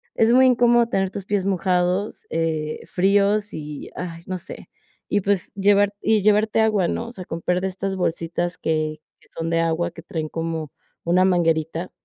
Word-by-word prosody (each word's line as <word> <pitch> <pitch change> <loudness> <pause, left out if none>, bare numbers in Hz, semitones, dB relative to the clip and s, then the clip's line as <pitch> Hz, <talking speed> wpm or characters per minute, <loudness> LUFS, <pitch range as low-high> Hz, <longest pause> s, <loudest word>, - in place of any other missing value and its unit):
es 225 +1 +4
muy 260 +1 +6
incómodo 240 -1 +4
tener 195 -4 0
tus 195 -1 -6
pies 200 -1 0
mojados, 185 +1 0
eh, 160 -2 -1
fríos 200 +2 +2
y, 150 -1 -7
ay, 170 -2 -6
no 185 - -3
sé, - - -10 0.4
y 205 - +1
pues 195 -1 0
llevar 200 +1 +3
y 220 -1 +2
llevarte 215 +1 +3
agua, 215 -5 +2
¿no?, 230 - -3
o - - -8
sea, 185 -7 -9
comprar 180 +2 -1
de 190 - 0
estas 190 +1 -3
bolsitas 175 0 -2
que 155 -1 -1 0.2
que - - -25
son 165 0 -4
de 165 - +2
agua, 165 +1 0
que - - -11
traen 160 -5 -4
como 165 -2 -4 0.3
una 180 +2 +3
manguerita 165 -1 +1
185 Hz, 180 wpm, -22 LUFS, 165-205 Hz, 0.4 s, muy